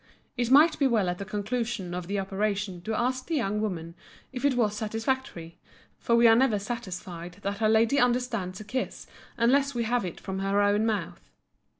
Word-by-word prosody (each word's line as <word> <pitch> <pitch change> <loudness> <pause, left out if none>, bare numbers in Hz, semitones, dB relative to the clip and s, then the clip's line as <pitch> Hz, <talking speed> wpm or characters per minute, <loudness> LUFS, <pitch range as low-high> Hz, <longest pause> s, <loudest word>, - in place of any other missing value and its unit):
It 240 -2 -1
might 300 +5 +6
be 280 - +4
well 215 -7 +2
at 180 - -3
the 200 - -4
conclusion 210 -2 -3
of 180 -1 -5
the 200 +1 -2
operation 195 -1 -2
to 220 +5 -3
ask 255 +2 -1
the 330 - -1
young 210 -6 0
woman 170 -6 -4 0.4
if 250 0 -5
it 285 -2 +3
was 215 -4 +1
satisfactory, 220 - -3 0.4
for 235 - +1
we 235 0 +5
are 225 - +7
never 240 -3 +3
satisfied 185 -5 -6
that 200 +2 -3
a 215 - +4
lady 225 +5 +3
understands 240 -7 0
a - - -7
kiss 255 +5 -4 0.3
unless 275 +4 +2
we 235 - 0
have 240 +1 0
it 180 -3 -6
from 190 -1 -5
her 195 +1 +1
own 205 +2 +3
mouth. 180 -6 -3
215 Hz, 195 wpm, -27 LUFS, 195-245 Hz, 0.4 s, are